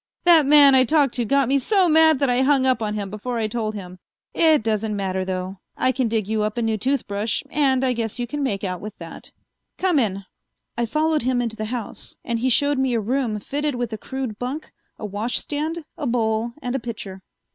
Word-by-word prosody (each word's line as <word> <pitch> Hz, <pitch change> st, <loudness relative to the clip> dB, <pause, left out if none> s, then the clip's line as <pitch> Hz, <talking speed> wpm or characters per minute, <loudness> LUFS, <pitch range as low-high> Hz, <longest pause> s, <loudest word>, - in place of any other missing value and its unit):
"That 330 Hz, -5 st, +6 dB
man 285 Hz, -1 st, +7 dB
I 260 Hz, -1 st, +6 dB
talked 285 Hz, -1 st, +2 dB
to 240 Hz, -, -1 dB
got 275 Hz, +2 st, +2 dB
me 275 Hz, +2 st, +3 dB
so 385 Hz, -, +3 dB
mad 320 Hz, -1 st, +5 dB
that 275 Hz, +1 st, +1 dB
I 245 Hz, 0 st, +2 dB
hung 270 Hz, -1 st, +3 dB
up 255 Hz, -3 st, +2 dB
on 210 Hz, -1 st, -2 dB
him 200 Hz, -2 st, -4 dB
before 235 Hz, +4 st, -4 dB
I 225 Hz, -, 0 dB
told 215 Hz, -1 st, -3 dB
him. 180 Hz, -2 st, -9 dB, 0.3 s
It 315 Hz, -7 st, +4 dB
doesn't 215 Hz, -1 st, -1 dB
matter, 190 Hz, -1 st, -2 dB
though. 185 Hz, 0 st, -4 dB, 0.2 s
I 255 Hz, -, +2 dB
can 255 Hz, -1 st, 0 dB
dig 220 Hz, -3 st, -1 dB
you 220 Hz, 0 st, 0 dB
up 215 Hz, +2 st, -2 dB
a 235 Hz, -, 0 dB
new 225 Hz, -1 st, +1 dB
toothbrush, 215 Hz, -3 st, -1 dB
and 265 Hz, -3 st, +2 dB
I 255 Hz, -, +2 dB
guess 230 Hz, -2 st, -3 dB
you 245 Hz, -, -2 dB
can 295 Hz, +4 st, -4 dB
make 210 Hz, -8 st, -2 dB
out 180 Hz, -2 st, -3 dB
with 210 Hz, 0 st, -8 dB
that. 165 Hz, -1 st, -9 dB, 0.5 s
Come 360 Hz, -5 st, +2 dB
in." 200 Hz, -5 st, -1 dB, 0.5 s
I 235 Hz, 0 st, -1 dB
followed 310 Hz, +5 st, +1 dB
him 250 Hz, +1 st, 0 dB
into 230 Hz, -2 st, -2 dB
the 215 Hz, -, -4 dB
house, 235 Hz, 0 st, -5 dB
and 235 Hz, -1 st, -1 dB
he 255 Hz, +3 st, +1 dB
showed 285 Hz, +2 st, +2 dB
me 260 Hz, -2 st, +1 dB
a -, -, +2 dB
room 230 Hz, -1 st, -1 dB
fitted 290 Hz, +6 st, -2 dB
with 240 Hz, -2 st, -3 dB
a -, -, -3 dB
crude 260 Hz, -4 st, -5 dB
bunk, 265 Hz, +5 st, -5 dB, 0.3 s
a -, -, -6 dB
washstand, 290 Hz, -, -3 dB
a 290 Hz, -, -2 dB
bowl 230 Hz, -1 st, 0 dB
and 245 Hz, 0 st, -2 dB
a -, -, 0 dB
pitcher. 210 Hz, -5 st, -7 dB
240 Hz, 225 wpm, -22 LUFS, 215-275 Hz, 0.5 s, man